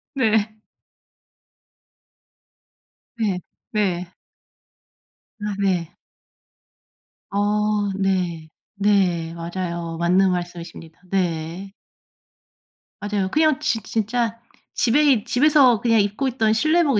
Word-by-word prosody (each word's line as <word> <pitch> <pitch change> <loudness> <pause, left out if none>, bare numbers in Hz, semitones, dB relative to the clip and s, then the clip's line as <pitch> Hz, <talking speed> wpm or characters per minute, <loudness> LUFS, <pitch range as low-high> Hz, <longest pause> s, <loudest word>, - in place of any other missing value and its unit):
네. 220 -3 +1 2.6
네. 200 -5 0 0.3
네. 180 -4 -1 1.3
아 210 -1 -3
네. 180 -4 0 1.4
어. 210 0 +1
네. 180 -5 -1 0.3
네. 190 -5 +1
맞아요. 170 -1 -4
맞는 185 +2 +3
말씀이십니다. 175 -2 -6
네. 180 +1 -2 1.3
맞아요. 205 -2 -1
그냥 310 -2 +3
진 225 -2 0
진짜 230 +2 -1 0.3
집에 255 +5 +3
있 265 -8 +3
집에서 265 -3 +4
그냥 230 -2 +3
입고 205 +6 0
있던 225 -3 +1
실내복 310 0 +3
205 Hz, 150 characters per minute, -22 LUFS, 175-225 Hz, 2.6 s, 집에서